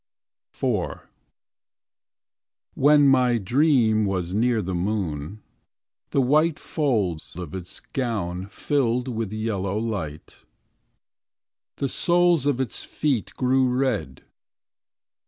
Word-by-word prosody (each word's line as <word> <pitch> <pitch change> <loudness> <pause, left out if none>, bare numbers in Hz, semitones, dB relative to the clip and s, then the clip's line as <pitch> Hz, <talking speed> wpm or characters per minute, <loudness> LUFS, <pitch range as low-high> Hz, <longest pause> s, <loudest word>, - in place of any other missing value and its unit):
IV - - -1 1.7
When 145 0 +5
my 125 -3 +4
dream 115 - +3
was 90 -2 -2
near 115 +2 +2
the 95 +1 -3
moon. 90 -1 -3 0.7
The 140 - +2
white 150 +5 +3
folds 105 - -1
of 90 -4 -7
its 90 -1 -7
gown 100 -8 -3
Filled 125 +1 0
with 115 -4 -3
yellow 105 -3 -2
light. 100 -10 -5 1.3
The 140 - -1
soles 175 0 +2
of 140 -3 +1
its 130 -3 -3
feet 135 -8 -2
Grew 130 0 +2
red. 125 - -1
115 Hz, 100 wpm, -24 LUFS, 95-135 Hz, 1.7 s, When